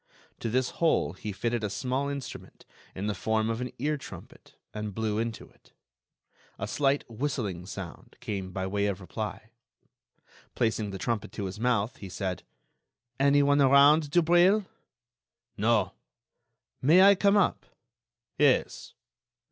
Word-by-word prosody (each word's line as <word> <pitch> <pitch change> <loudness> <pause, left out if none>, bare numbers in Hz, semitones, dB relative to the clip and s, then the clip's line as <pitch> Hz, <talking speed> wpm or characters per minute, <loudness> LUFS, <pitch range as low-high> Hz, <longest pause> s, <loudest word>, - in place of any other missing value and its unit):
To 115 - -3
this 125 +2 0
hole 165 - +2
he 105 - -6
fitted 115 +3 -2
a 105 - -1
small 130 +5 -2
instrument 140 -2 -8 0.3
in 95 - -4
the 105 - 0
form 110 +1 0
of 115 +2 -3
an 125 - -4
ear 150 +4 -1
trumpet 135 - -12 0.2
and 105 -2 -5
blew 110 -1 -1
into 115 -1 -4
it. - - -27 0.8
A 100 - -4
slight 140 +4 0
whistling 110 -8 -3
sound 95 -4 -9
came 100 -6 -4
by 95 0 -3
way 100 +1 0
of 100 -2 -2
reply. 110 +3 -6 1.0
Placing 110 -2 0
the 95 - -5
trumpet 115 +2 -3
to 100 - -4
his 95 +3 -6
mouth, 115 -2 0
he 100 - -9
said: 95 -1 -4 0.8
"Anyone 140 +1 +4
around, 140 +3 +6
Dubreuil?" 175 +5 +4 0.9
"No." 105 -3 +1 0.9
"May 165 +8 +6
I 200 +1 +8
come 200 +1 +3
up?" 205 - +1 0.7
"Yes." - - +1
115 Hz, 140 wpm, -28 LUFS, 105-140 Hz, 1.0 s, I